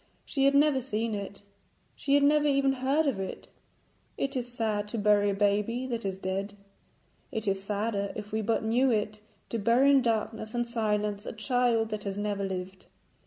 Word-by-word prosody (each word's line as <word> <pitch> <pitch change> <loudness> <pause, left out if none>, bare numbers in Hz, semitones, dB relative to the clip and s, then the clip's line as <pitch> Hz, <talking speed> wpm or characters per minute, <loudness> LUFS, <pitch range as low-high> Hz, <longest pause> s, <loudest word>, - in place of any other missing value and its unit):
She 275 -2 0
had 275 0 +4
never 285 -2 +4
seen 225 -2 -2
it. 200 -1 -6 0.5
She 280 0 +1
had 285 - +4
never 295 +1 +4
even 275 -1 +3
heard 270 +4 +1
of 270 -9 0
it. 190 - -6 0.7
It 275 0 -2
is 245 -1 -3
sad 215 -3 -1
to 230 - -5
bury 205 -1 +3
a - - +1
baby 210 +5 +1
that 235 -4 -4
is 190 -1 -2
dead; 195 +2 -3 0.7
it 220 -1 -3
is 195 -1 0
sadder, 200 0 -2
if 210 +1 -7
we 220 +1 0
but 225 +1 0
knew 245 +4 +3
it, 215 -2 -1 0.3
to 230 - -2
bury 240 +6 +4
in 275 -1 +6
darkness 225 -1 -2
and 240 0 +1
silence 210 -3 -1
a - - -4
child 230 0 +1
that 215 -1 -4
has 195 0 -3
never 205 -1 -2
lived. 190 0 -5
220 Hz, 190 wpm, -29 LUFS, 205-250 Hz, 0.7 s, in